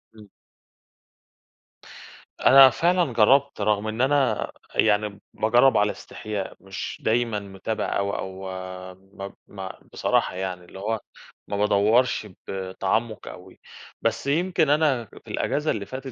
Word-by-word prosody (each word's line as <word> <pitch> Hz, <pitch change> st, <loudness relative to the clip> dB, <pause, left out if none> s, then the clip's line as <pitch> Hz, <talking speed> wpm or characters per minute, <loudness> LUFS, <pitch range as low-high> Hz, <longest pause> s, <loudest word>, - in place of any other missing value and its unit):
إمم. 105 Hz, -2 st, -15 dB, 2.1 s
أنا 135 Hz, 0 st, +9 dB
فعلًا 170 Hz, 0 st, +1 dB
جرّبت 135 Hz, +5 st, +3 dB
رغم 105 Hz, 0 st, +1 dB
إن 110 Hz, +3 st, -2 dB
أنا 135 Hz, -5 st, +2 dB, 0.2 s
يعني 105 Hz, -1 st, +2 dB
باجرّب 120 Hz, +2 st, +4 dB
على 105 Hz, 0 st, +3 dB
إستحياء، 105 Hz, -3 st, -6 dB
مش 95 Hz, -1 st, -7 dB
دايمًا 115 Hz, -1 st, +1 dB
متابع 100 Hz, +2 st, -3 dB
أوي 100 Hz, 0 st, -1 dB
أو 95 Hz, 0 st, -6 dB, 0.5 s
ما 95 Hz, +1 st, -10 dB
ب -, -, -14 dB
ما 95 Hz, -2 st, -8 dB
بصراحة -, -, +1 dB
يعني 90 Hz, -1 st, -4 dB
اللي 95 Hz, -, -12 dB
هو 110 Hz, +2 st, -1 dB, 0.5 s
ما 100 Hz, -, -3 dB
بادوّرش 105 Hz, +3 st, +2 dB, 0.2 s
بتعمُّق 95 Hz, +4 st, -2 dB
أوي، 90 Hz, +1 st, -11 dB, 0.4 s
بس 115 Hz, +3 st, -1 dB
يمكن 160 Hz, +1 st, +2 dB
أنا 145 Hz, -5 st, +2 dB
في -, -, -17 dB
الإجازة 150 Hz, +1 st, 0 dB
اللي 100 Hz, -2 st, -3 dB
فاتت 130 Hz, +3 st, -7 dB
110 Hz, 125 wpm, -24 LUFS, 100-130 Hz, 2.1 s, أنا